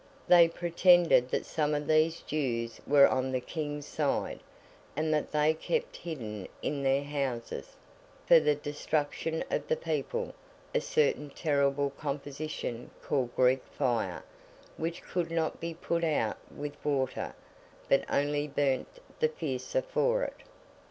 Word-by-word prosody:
They 175 Hz, -1 st, +8 dB
pretended 175 Hz, -5 st, +4 dB
that -, -, -1 dB
some 150 Hz, -2 st, 0 dB
of 145 Hz, 0 st, -2 dB
these 155 Hz, +2 st, +3 dB
Jews 120 Hz, -6 st, -2 dB
were 140 Hz, -1 st, +7 dB
on 130 Hz, 0 st, 0 dB
the 130 Hz, -, 0 dB
King's 145 Hz, +1 st, -4 dB
side, 150 Hz, -2 st, -1 dB, 0.6 s
and 155 Hz, 0 st, +1 dB
that 150 Hz, -, 0 dB
they 150 Hz, +1 st, +3 dB
kept 480 Hz, -, -2 dB
hidden 110 Hz, -, -6 dB, 0.2 s
in 140 Hz, -1 st, -1 dB
their 135 Hz, +1 st, +2 dB
houses, 140 Hz, -5 st, -4 dB, 0.5 s
for 170 Hz, -, +8 dB
the 150 Hz, -1 st, +2 dB
destruction 150 Hz, +2 st, -2 dB
of -, -, -1 dB
the 485 Hz, -, +2 dB
people, 485 Hz, 0 st, -2 dB, 0.4 s
a 485 Hz, -, +2 dB
certain 460 Hz, -, +1 dB
terrible 140 Hz, -2 st, +1 dB
composition 140 Hz, -3 st, -5 dB
called 130 Hz, -4 st, -1 dB
Greek 130 Hz, +1 st, +4 dB, 0.2 s
Fire, 115 Hz, -, 0 dB, 0.5 s
which 165 Hz, +1 st, -4 dB
could 175 Hz, -2 st, -2 dB
not 165 Hz, -1 st, -1 dB
be 170 Hz, 0 st, -4 dB
put 170 Hz, 0 st, -1 dB
out 150 Hz, -9 st, +1 dB
with 145 Hz, 0 st, -7 dB
water, 135 Hz, -3 st, -1 dB, 0.5 s
but 135 Hz, -, +4 dB
only 145 Hz, +1 st, +1 dB
burnt 140 Hz, -, -1 dB, 0.2 s
the 470 Hz, -, +3 dB
fiercer -, -, -2 dB
for -, -, +1 dB
it. -, -, -4 dB
150 Hz, 140 wpm, -30 LUFS, 140-165 Hz, 0.6 s, They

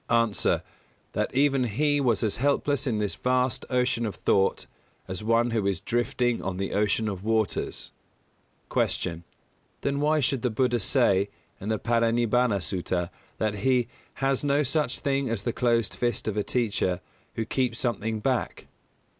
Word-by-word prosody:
_ 115 Hz, -3 st, +2 dB
A. -, -, +2 dB, 0.5 s
That -, -, -1 dB
even 135 Hz, -2 st, +3 dB
he 145 Hz, +6 st, +1 dB
was 120 Hz, -5 st, +2 dB
as 110 Hz, -, 0 dB
helpless 140 Hz, +1 st, +1 dB
in 115 Hz, -4 st, 0 dB
this 105 Hz, -1 st, 0 dB
vast 125 Hz, 0 st, 0 dB
ocean 125 Hz, -2 st, +1 dB
of 105 Hz, -, -5 dB
thought 95 Hz, 0 st, +1 dB, 0.4 s
as 95 Hz, +3 st, -5 dB
one 115 Hz, +2 st, +2 dB
who 110 Hz, -3 st, 0 dB
is 95 Hz, -4 st, 0 dB
drifting 120 Hz, 0 st, 0 dB
on 95 Hz, -1 st, -3 dB
the 95 Hz, +1 st, -3 dB
ocean 105 Hz, +2 st, +1 dB
of 95 Hz, -2 st, -4 dB
waters. 110 Hz, -2 st, -1 dB, 0.8 s
254. 90 Hz, -, +1 dB
Q. 85 Hz, 0 st, -9 dB, 0.6 s
_Then 140 Hz, 0 st, 0 dB
why 155 Hz, +1 st, +3 dB
should 135 Hz, -2 st, 0 dB
the 125 Hz, -, +1 dB
Buddha 120 Hz, +1 st, +1 dB
say, 100 Hz, -4 st, +2 dB, 0.3 s
in 100 Hz, -, -5 dB
the 110 Hz, -, +1 dB
Parinibbāna 115 Hz, -2 st, +2 dB
Sutta, 90 Hz, +1 st, -2 dB, 0.3 s
that 105 Hz, -1 st, -1 dB
he 125 Hz, +2 st, +2 dB, 0.3 s
"has 135 Hz, 0 st, 0 dB
no 145 Hz, +1 st, +2 dB
such 140 Hz, -2 st, 0 dB
thing 140 Hz, -2 st, 0 dB
as 115 Hz, -4 st, -2 dB
the 120 Hz, -, -1 dB
closed 115 Hz, -3 st, +1 dB
fist 120 Hz, -3 st, -1 dB
of 110 Hz, -, -1 dB
a 105 Hz, -, +1 dB
teacher, 100 Hz, -6 st, 0 dB, 0.4 s
who 115 Hz, -, -1 dB
keeps 125 Hz, 0 st, 0 dB
something 115 Hz, -3 st, -1 dB
back"? 130 Hz, +1 st, -1 dB
115 Hz, 165 wpm, -27 LUFS, 105-130 Hz, 0.8 s, even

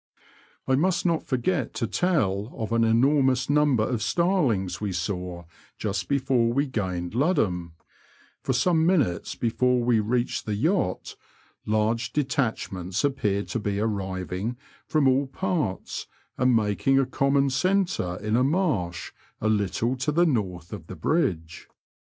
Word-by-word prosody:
I 130 Hz, -, +2 dB
must 175 Hz, +8 st, +1 dB
not 165 Hz, -2 st, 0 dB
forget 135 Hz, +2 st, -1 dB
to -, -, -1 dB
tell 115 Hz, -, 0 dB
of 110 Hz, -3 st, -4 dB
an 115 Hz, 0 st, +3 dB
enormous 130 Hz, +3 st, +3 dB
number 145 Hz, -6 st, +3 dB
of 120 Hz, -1 st, -1 dB
starlings 115 Hz, -, +1 dB
we 105 Hz, -2 st, -2 dB
saw 90 Hz, -1 st, -4 dB, 0.3 s
just 100 Hz, -3 st, -2 dB
before 130 Hz, -4 st, +2 dB
we 140 Hz, +4 st, +1 dB
gained 95 Hz, -9 st, -3 dB
Ludham; 100 Hz, -, 0 dB, 0.7 s
for -, -, -1 dB
some 160 Hz, +6 st, +2 dB
minutes 150 Hz, -, +1 dB
before 125 Hz, +2 st, +1 dB
we 120 Hz, -2 st, +3 dB
reached 120 Hz, +3 st, -1 dB
the 105 Hz, -, -1 dB
yacht 155 Hz, -, 0 dB, 0.5 s
large 110 Hz, +2 st, 0 dB
detachments 110 Hz, -, -1 dB
appeared 105 Hz, -8 st, 0 dB
to 120 Hz, -, -2 dB
be 100 Hz, -1 st, -2 dB
arriving 100 Hz, +1 st, -3 dB, 0.3 s
from 150 Hz, -3 st, +2 dB
all 135 Hz, +1 st, +3 dB
parts 165 Hz, -, -3 dB, 0.3 s
and 125 Hz, -1 st, +3 dB
making 110 Hz, +5 st, +2 dB
a 135 Hz, -, +3 dB
common 140 Hz, +1 st, +1 dB
centre 180 Hz, -, 0 dB
in 105 Hz, +1 st, 0 dB
a 125 Hz, -, +3 dB
marsh 135 Hz, -, 0 dB, 0.3 s
a 110 Hz, -, 0 dB
little 110 Hz, +4 st, 0 dB
to 135 Hz, +4 st, -1 dB
the 170 Hz, +4 st, +3 dB
north 95 Hz, -, -2 dB
of -, -, -8 dB
the -, -, -7 dB
bridge. 85 Hz, -, -1 dB
120 Hz, 140 wpm, -25 LUFS, 100-140 Hz, 0.7 s, an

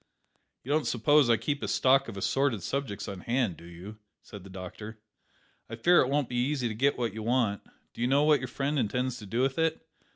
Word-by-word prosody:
"You 135 Hz, -, -5 dB
don't 155 Hz, +1 st, +1 dB
suppose 135 Hz, +3 st, +3 dB
I 115 Hz, -, +5 dB
keep 145 Hz, +6 st, -3 dB
a -, -, -3 dB
stock 135 Hz, +1 st, +3 dB
of 110 Hz, -4 st, -7 dB
assorted 120 Hz, -1 st, 0 dB
subjects 130 Hz, -1 st, -3 dB
on 100 Hz, -2 st, -6 dB
hand, 115 Hz, -2 st, -1 dB
do 85 Hz, -, -14 dB
you?" 90 Hz, +5 st, -11 dB, 0.2 s
said 100 Hz, -3 st, -11 dB
the 100 Hz, -, -12 dB
doctor. 95 Hz, +4 st, -8 dB, 0.7 s
"I 115 Hz, -, -5 dB
fear 175 Hz, +10 st, +5 dB
it 130 Hz, -, 0 dB
won't 145 Hz, -2 st, +1 dB
be 125 Hz, -, -6 dB
easy 130 Hz, 0 st, 0 dB
to 110 Hz, -, -3 dB
get 135 Hz, +6 st, +1 dB
what 120 Hz, -2 st, -2 dB
you 110 Hz, -, -6 dB
want. 115 Hz, -3 st, 0 dB, 0.3 s
Do -, -, -8 dB
you 120 Hz, -, +2 dB
know 140 Hz, +3 st, +3 dB
what 150 Hz, -1 st, +4 dB
your 130 Hz, -, -5 dB
friend 140 Hz, +4 st, -2 dB
intends 125 Hz, +3 st, -1 dB
to 105 Hz, -, -10 dB
do 115 Hz, +5 st, -1 dB
with 135 Hz, +3 st, 0 dB
it?" 160 Hz, 0 st, 0 dB
125 Hz, 230 wpm, -28 LUFS, 105-140 Hz, 0.7 s, I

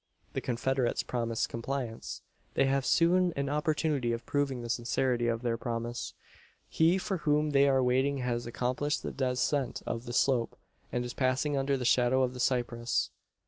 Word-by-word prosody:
The -, -, -2 dB
confederates 125 Hz, +1 st, 0 dB
promise 115 Hz, -2 st, -1 dB
compliance. 115 Hz, -1 st, -5 dB, 0.3 s
They -, -, +4 dB
have 135 Hz, -1 st, +1 dB
soon 175 Hz, +1 st, +4 dB
an 140 Hz, 0 st, -1 dB
opportunity 150 Hz, -4 st, 0 dB
of 115 Hz, 0 st, -5 dB
proving 135 Hz, -4 st, -1 dB
the -, -, -5 dB
sincerity 120 Hz, +1 st, 0 dB
of 115 Hz, 0 st, -1 dB
their 115 Hz, -1 st, 0 dB
promise. 120 Hz, 0 st, -4 dB, 0.5 s
He 165 Hz, +3 st, +3 dB
for 190 Hz, 0 st, -2 dB
whom 150 Hz, -1 st, +1 dB
they 140 Hz, 0 st, +5 dB
are 135 Hz, -1 st, +3 dB
waiting 130 Hz, +3 st, +2 dB
has 120 Hz, -2 st, -2 dB
accomplished 125 Hz, +5 st, -1 dB
the -, -, -3 dB
descent 130 Hz, 0 st, -1 dB
of 115 Hz, +1 st, -3 dB
the 120 Hz, -, -6 dB
slope, 125 Hz, -2 st, +1 dB, 0.3 s
and 125 Hz, 0 st, -1 dB
is 120 Hz, -, -5 dB
passing 130 Hz, +3 st, +1 dB
under 135 Hz, 0 st, +1 dB
the 125 Hz, -, -4 dB
shadow 125 Hz, +2 st, +4 dB
of 125 Hz, -1 st, 0 dB
the 125 Hz, -, -8 dB
cypress. 120 Hz, -1 st, 0 dB
130 Hz, 170 wpm, -30 LUFS, 120-140 Hz, 0.5 s, they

